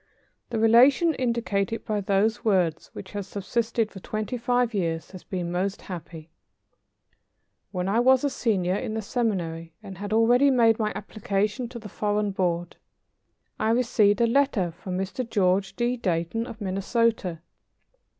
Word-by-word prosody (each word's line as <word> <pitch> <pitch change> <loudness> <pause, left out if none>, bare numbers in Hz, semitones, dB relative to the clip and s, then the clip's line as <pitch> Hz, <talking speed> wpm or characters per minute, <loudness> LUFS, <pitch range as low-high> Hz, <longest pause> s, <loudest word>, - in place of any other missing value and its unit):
The 235 - -2
relation 250 +9 +5
indicated 230 -5 -1
by 210 -1 -1
those 200 +3 +1
words, 185 -7 +1
which 190 - -9
has 205 -2 -5
subsisted 220 +3 -1
for 195 - -9
twenty 215 +5 -4
five 245 0 +1
years, 165 -5 -2
has 185 -2 -10
been 175 -2 -4
most 190 +3 -2
happy. 165 -3 -9 1.4
When 180 -1 -2
I 210 +4 +2
was 260 +2 +4
a 285 - +2
senior 190 -9 0
in 215 +2 -3
the 220 - -3
seminary 170 -8 -2
and 190 -2 -9
had 205 0 -5
already 240 +5 +4
made 230 -4 +4
my 215 -1 0
application 210 +3 -2
to 245 - -8
the 225 -2 -8
Foreign 210 +1 -1
Board, 175 -2 -2 0.8
I 220 - +1
received 225 -3 +3
a - - +5
letter 230 -8 +2
from 180 +2 -6
Mr. 195 +7 -3
George 190 -1 +1
D. 245 +1 0
Dayton 180 +3 -1
of 225 - -9
Minnesota. 195 -2 0
210 Hz, 150 wpm, -26 LUFS, 185-235 Hz, 1.4 s, relation